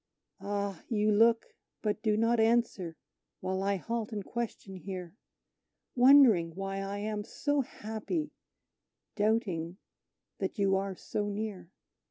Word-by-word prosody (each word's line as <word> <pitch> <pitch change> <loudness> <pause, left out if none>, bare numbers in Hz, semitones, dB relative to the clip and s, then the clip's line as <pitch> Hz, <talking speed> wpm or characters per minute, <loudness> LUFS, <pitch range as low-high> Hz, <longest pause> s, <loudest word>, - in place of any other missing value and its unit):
Ah! 200 -2 -3
you 215 -1 +2
look 230 +2 +4 0.3
but 210 0 -1
do 215 -1 +2
not 230 +1 +3
answer 220 -7 +1 0.4
while 190 +1 -2
I 200 +1 +1
halt 230 +3 -3
and 205 -3 -4
question 225 -5 -5
here, 185 -1 -7 0.8
Wondering 245 - +6
why 195 0 -3
I 195 +1 -3
am 210 0 -3
so 290 +6 0
happy, 235 +7 -4 0.8
doubting 200 -6 0 0.6
that - - -3
you 195 -1 +3
are 195 0 -1
so 205 +3 -3
near. 205 -4 -4
205 Hz, 125 wpm, -31 LUFS, 195-225 Hz, 0.8 s, Wondering